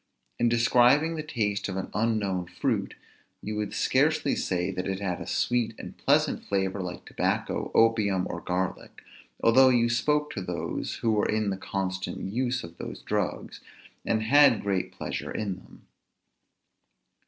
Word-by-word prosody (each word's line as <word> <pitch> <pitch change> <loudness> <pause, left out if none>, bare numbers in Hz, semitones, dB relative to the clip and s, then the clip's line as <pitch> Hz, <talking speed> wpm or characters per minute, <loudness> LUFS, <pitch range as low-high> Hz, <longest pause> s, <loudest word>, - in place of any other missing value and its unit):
In 120 - +3
describing 125 +7 +4
the 155 - -3
taste 110 -9 -2
of 95 - -4
an 95 - -4
unknown 100 -4 0
fruit, - - -2 0.4
you 105 +1 -5
would 105 -1 -3
scarcely - - +2
say 90 +1 -1
that 90 0 -4
it 95 0 -2
had 95 -3 -3
a - - -7
sweet 120 -2 0
and - - -9
pleasant - - +2
flavor 95 0 -1
like 90 -1 -6
tobacco, - - -1
opium, 105 -5 +3
or 85 - -5
garlic, 90 +1 -3 0.4
although 130 +3 +6
you 120 -2 +3
spoke 150 +6 +1
to 95 - -4
those 85 -3 -4
who 115 - +3
were 105 -1 +1
in 110 -2 +1
the - - -1
constant 95 0 -4
use 125 0 -1
of 85 0 -11
those - - -7
drugs, - - -3 0.4
and 110 -1 0
had 140 0 +5
great 95 -2 -1
pleasure - - -5
in 100 -4 -3
them. - - -17
105 Hz, 155 wpm, -27 LUFS, 95-120 Hz, 0.4 s, although